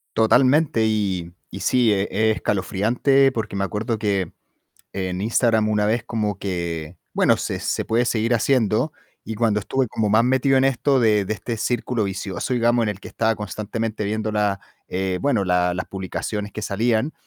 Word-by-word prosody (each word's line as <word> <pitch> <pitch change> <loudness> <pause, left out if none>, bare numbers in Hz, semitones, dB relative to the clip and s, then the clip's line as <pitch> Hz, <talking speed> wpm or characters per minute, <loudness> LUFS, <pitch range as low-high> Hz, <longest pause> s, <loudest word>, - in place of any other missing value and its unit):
Totalmente, 130 +1 +3
y 95 -6 -1 0.2
y - - -7
sí 125 -4 +3
e 100 -1 +2
es 110 +1 +1
escalofriante, 120 +7 +2
porque 105 -3 -3
me 100 - 0
acuerdo 105 +4 -2
que 100 -5 -1 0.6
en 95 -1 -3
Instagram 110 -1 +2
una 105 -1 +1
vez 115 +2 +1
como 105 -4 -2
que 85 -3 -4 0.2
bueno, - - +3
se - - -3
se - - -2
puede 115 +2 +2
seguir 115 +1 +1
haciendo 120 +3 +1 0.3
y 110 - -5
cuando 110 -2 +1
estuve 130 +5 -1
como 105 -1 -1
más 110 +3 +4
metido 130 +2 +3
en 130 - +3
esto 135 +1 +2
de 105 -3 +3
de 110 - -2
este 115 +5 -4
círculo 120 0 -1
vicioso, 95 +3 -4
digamos, 120 0 +2
en 110 - +1
el 100 -1 -5
que - - -10
estaba 110 -1 0
constantemente 105 +2 -4
viendo 110 +1 -2
la, 105 -2 0 0.3
eh 95 0 -2
bueno, 135 -8 +1
la 90 0 +1
las 90 - -3
publicaciones 105 +2 -4
que 110 - -6
salían, 115 +7 0
110 Hz, 175 wpm, -22 LUFS, 100-120 Hz, 0.6 s, más